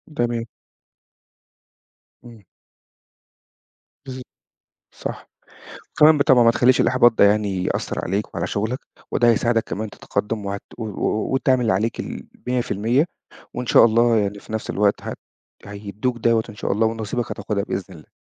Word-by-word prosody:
تمام. 120 -2 -1 1.8
امم. 115 -3 -14 1.6
بالض 130 0 -6 0.7
صح. - - -7 0.7
كمان 155 +1 +7
بالطبع 130 -3 +5
ما 115 - +6
تخليش 125 +2 +3
الإحباط 120 -2 +4
ده 105 - +4
يعني 100 -3 +2
يأثّر - - -2
عليك 100 +4 -3
وعلى - - -2
شُغلك، 110 +5 -2 0.3
وده 120 - +3
هيساعدك 115 0 +2
كمان 110 +1 -5
تتقدم 105 +1 -3
وهتقو 100 +3 -7
وت 105 - -5 0.4
وتعمل 135 -1 +2
اللي 110 - +2
عليك 110 +5 -1
ال100%. 125 +1 -1 0.5
وإن 125 - -4
شاء 115 - +6
الله 115 +1 +4
يعني 100 -1 -1
في - - -12
نفس 110 - -3
الوقت 100 0 +1
هت - - -5 0.5
هيدّوك 105 +4 -4
دوّة 115 -1 +2
إن 105 - -9
شاء 105 - -3
الله، 110 +2 +2
ونصيبك 115 +1 -3
هتاخدها 100 -2 -3
بإذن 95 -2 -5
الله. 80 - -16
115 Hz, 140 wpm, -22 LUFS, 105-120 Hz, 1.8 s, كمان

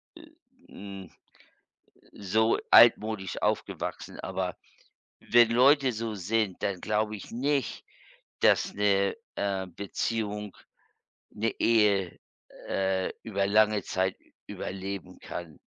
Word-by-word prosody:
äh, 325 -1 -14 0.4
hm, 100 -2 -10 1.0
so 110 +3 +1
altmodisch 110 -4 +5
aufgewachsen, - - -3
aber - - -3 0.6
wenn 120 -1 +4
Leute 135 +2 +5
so 115 -1 -4
sind, 105 0 -1
dann 95 -3 -2
glaube 105 0 -1
ich 100 - -10
nicht, 135 0 -1 0.6
dass - - +3
'ne, 100 -1 +2 0.2
äh, 95 -2 -1
Beziehung, 105 +2 -4 0.7
'ne 110 +2 -1
Ehe, 105 -5 +2 0.5
äh, 95 -1 0
über 100 -3 -1
lange 105 0 +3
Zeit 95 +1 -1
ü - - -29 0.2
überleben 95 -2 -6
kann. 85 -4 -8
105 Hz, 105 wpm, -28 LUFS, 95-115 Hz, 1.0 s, altmodisch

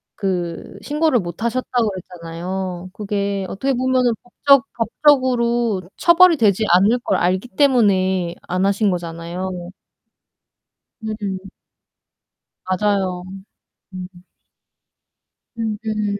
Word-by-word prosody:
그 175 -4 -3
신고를 300 -3 +1
못 175 +2 -6
하셨다고 240 -1 0
그랬잖아요. 180 0 -6
그게 200 -1 -2
어떻게 265 +9 -1
보면은 255 -1 +2
법적 275 +2 +3
법적으로 235 -3 +2 0.2
처벌이 345 0 +6
되지 215 -3 +3
않을 205 +7 +4
걸 190 - +1
알기 185 +6 0
때문에 190 - +2
안 185 +2 0
하신 200 +1 +2
거잖아요. 175 +1 -5 1.3
음. 205 -3 -5 1.2
맞아요. 185 -2 0 0.7
음. 180 -1 -6 1.5
음음음. 215 -2 -2
200 Hz, 210 characters per minute, -20 LUFS, 185-240 Hz, 1.5 s, 처벌이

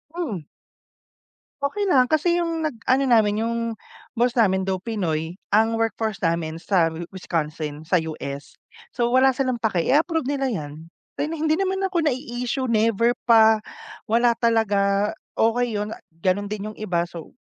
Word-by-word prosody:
Hmm. 220 - -4 1.1
Okey 280 +9 -1
lang 255 -2 +5
kasi 340 +3 +2
yung 330 -1 -1
nag 290 -7 -3
ano 265 +2 +4
namin 220 -4 +3
yung 230 0 -1 0.6
boss 240 +1 +2
namin 195 -6 +2
though 190 -1 -1
pinoy, 175 -6 -2 0.2
ang 220 +2 +3
workforce 225 -1 -1
namin 165 -1 0
sa 170 0 +2 0.2
Wisconsin 155 -4 -4
sa 180 +3 +2
US 145 -3 -6 0.4
so 240 -1 +1
wala 260 0 +4
silang 255 -3 -1
paki 200 -7 0
i-approve 320 +2 +2
nila 275 0 -1
yan, 155 - -5 0.3
rin 310 +3 -1
hindi 315 +2 +1
naman 385 0 0
ako 350 -4 +1
nai-issue 250 -1 -2
never 230 +1 +3 0.2
pa, 220 -1 +6 0.5
wala 235 +2 +4
talaga, 205 -3 +2 0.2
okey 230 0 +1
yun, 210 +1 -2 0.3
ganun 195 +2 +1
din 210 0 -5
yung - - -17
iba 180 -5 0
so, 170 -2 -10
225 Hz, 150 wpm, -23 LUFS, 190-260 Hz, 1.1 s, pa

